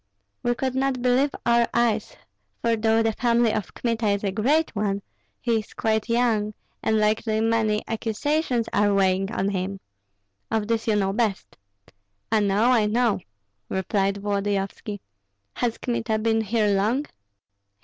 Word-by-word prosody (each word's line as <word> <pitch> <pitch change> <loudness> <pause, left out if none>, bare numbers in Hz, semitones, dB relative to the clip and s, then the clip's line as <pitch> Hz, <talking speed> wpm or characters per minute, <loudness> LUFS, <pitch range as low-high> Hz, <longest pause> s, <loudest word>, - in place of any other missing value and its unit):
We 240 0 +1
could 260 +1 -2
not 265 -1 0
believe 255 +3 +3 0.2
our 235 0 +4
eyes; 225 -3 +1 0.4
for 230 -1 +1
though 225 0 +2
the 225 - +2
family 235 -1 +2
of 210 -4 -4
Kmita 230 -2 -1
is 200 0 +1
a 200 - 0
great 270 +9 +1
one, 200 -1 -1 0.4
he 235 -3 +1
is 215 - -11
quite 220 0 0
young, 225 -3 +1 0.3
and 220 - +1
likely 215 +1 +1
many 220 -1 +1
accusations 235 +3 -1
are 205 -1 +3
weighing 195 +1 +2
on 195 -2 0
him. 195 0 -3 0.7
Of 220 -2 -1
this 230 0 -1
you 220 - +3
know 195 -1 +1
best." 215 -2 -1 0.8
"I 220 - +4
know, 205 +4 +3
I 225 -4 +3
know," 225 -2 +2 0.5
replied 195 +1 0
Volodyovski. 200 +1 -2 0.6
"Has 235 -2 0
Kmita 230 -2 -1
been 225 0 +1
here 220 0 +1
long?" 225 +9 +1
220 Hz, 150 wpm, -24 LUFS, 205-235 Hz, 0.8 s, our